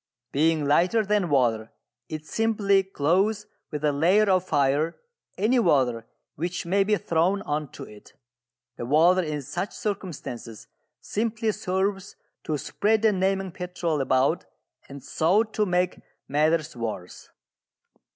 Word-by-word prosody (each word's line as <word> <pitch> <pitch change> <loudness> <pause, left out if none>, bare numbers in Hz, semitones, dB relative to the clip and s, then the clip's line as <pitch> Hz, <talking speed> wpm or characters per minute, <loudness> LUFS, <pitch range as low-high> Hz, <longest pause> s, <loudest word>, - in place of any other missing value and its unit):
Being 155 +1 +2
lighter 180 +9 +3
than 205 -3 +1
water, 120 -5 +1 0.4
it 155 -1 -6
simply 205 -1 +2
clothes 195 +4 0 0.2
with 150 -1 -3
a 150 - +3
layer 190 +8 +3
of 185 -1 +3
fire 145 0 +1 0.4
any 235 +6 +2
water 125 - +2 0.3
which 175 +4 -4
may 195 +3 +2
be 210 +1 +1
thrown 175 +4 0
on 150 -1 -3
to - - -8
it. 105 -1 -14 0.6
The 120 - -5
water 170 +6 +4
in 150 -4 -4
such 175 +9 -4
circumstances 125 - -5 0.4
simply 220 0 -1
serves 195 +1 -2 0.3
to 155 -2 -1
spread 215 +8 0
the 220 - +5
naming 190 0 0
petrol 175 -4 -2
about 135 +5 +1 0.4
and 140 -1 -10
so 175 +9 +2
to 215 -1 -2
make 180 0 0 0.3
matters 155 +2 +1
worse. 110 -7 -6
175 Hz, 130 wpm, -25 LUFS, 145-200 Hz, 0.6 s, the